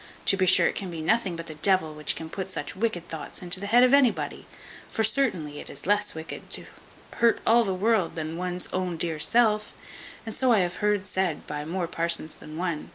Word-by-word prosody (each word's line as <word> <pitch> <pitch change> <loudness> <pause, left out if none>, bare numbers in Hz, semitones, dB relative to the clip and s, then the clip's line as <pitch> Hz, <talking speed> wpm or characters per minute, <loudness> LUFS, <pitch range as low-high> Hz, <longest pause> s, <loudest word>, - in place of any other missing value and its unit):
To - - +5
be 185 -1 +1
sure 185 - +5
it - - +2
can 195 - -5
be 165 -2 -6
nothing 190 +2 +1
but 165 0 -6
the 160 - -7
devil 160 0 +2
which 150 0 0
can 160 - -7
put 190 +3 -5
such - - -5
wicked 185 -4 -2
thoughts 160 +2 -7
into 180 +1 +3
the 200 - -4
head 240 +4 +5
of 255 +1 +4
anybody; 275 -4 +2 0.4
for 220 - -1
certainly 205 - +1
it - - -9
is 140 - -8
less 205 0 +1
wicked 160 0 -8
to - - -3 0.5
hurt 235 -1 +3
all 235 +1 +5
the 195 -3 -1
world 210 -1 +1
than 160 0 -4
one's 180 +1 -3
own 180 -2 -2
dear 160 -1 -3
self; 215 +3 +2 0.5
and 225 - -6
so 260 -2 +2
I 220 - +5
have 180 0 -2
heard 210 -2 +1
said 190 -4 -2
by 150 0 -5
more 175 +2 -2
parsons 170 -2 0
than 155 +1 -11
one. 170 -3 -3
185 Hz, 220 wpm, -26 LUFS, 165-210 Hz, 0.5 s, To